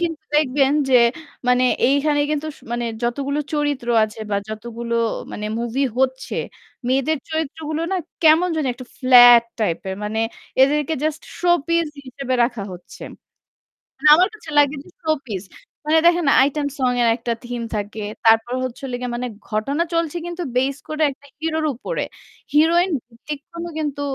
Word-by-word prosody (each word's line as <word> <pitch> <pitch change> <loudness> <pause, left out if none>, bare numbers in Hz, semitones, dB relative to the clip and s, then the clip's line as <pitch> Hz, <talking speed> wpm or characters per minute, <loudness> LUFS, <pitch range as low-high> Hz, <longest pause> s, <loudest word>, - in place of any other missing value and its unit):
কিন্তু 325 -3 -2
দেখবেন 275 -2 +3 0.2
যে 260 - +3 0.5
মানে 250 0 +4 0.2
এইখানে 290 +2 +2
কিন্তু 305 0 -1
সু - - -22
মানে 240 0 -1 0.2
যতগুলো 275 +4 -1
চরিত্র 290 -4 -1 0.2
আছে 215 +1 -9
বা 200 - +1
যতগুলো 235 +2 -5 0.4
মানে 210 - -4
movie 240 +4 0
হচ্ছে 260 0 0 0.5
মেয়েদের 275 +4 +1
চরিত্রগুলো 315 0 -3
না - - +1 0.3
কেমন 325 +3 +5
জানি 310 -3 0
একটা 250 0 -11
flat 245 -2 +8 0.2
type 190 -7 -1
এর। 190 - -3
মানে 215 +1 -2 0.4
এদেরকে 295 +3 +2
just 310 0 -2 0.2
showpiece 335 -2 +1 0.2
হিসেবে 260 0 -3
রাখা 235 -4 -3
হচ্ছে। 180 0 -12 1.0
মানে 285 +3 +1
আমার 365 +3 +4
কাছে 330 -7 -12
লাগে 290 0 +5
যে - - -17
showpiece. 265 - -2 0.4
মানে 320 +1 +5
দেখেন 345 -2 +3 0.2
item 290 0 -2
song 255 -2 +1
এর 235 - +4
একটা 235 -1 -2
theme 240 -1 -4
থাকে 210 +1 -4 0.2
তারপর 225 +2 +4
হচ্ছে 255 0 -5
হলো 250 -2 -3
গিয়ে 250 -1 -4
মানে 250 +1 -3 0.2
ঘটনা 255 +9 0
চলছে 335 0 0
কিন্তু 345 0 -5
based 265 +3 0
করে 310 0 -3
একটা 285 +1 -16
hero 320 0 -1
র - - +1
উপরে। - - -3 0.5
Heroine 340 +5 +4 0.2
ভিত্তিক 250 +5 -8
কোন 335 0 -5
কিন্তু 290 -2 -3
275 Hz, 160 wpm, -21 LUFS, 240-310 Hz, 1.0 s, flat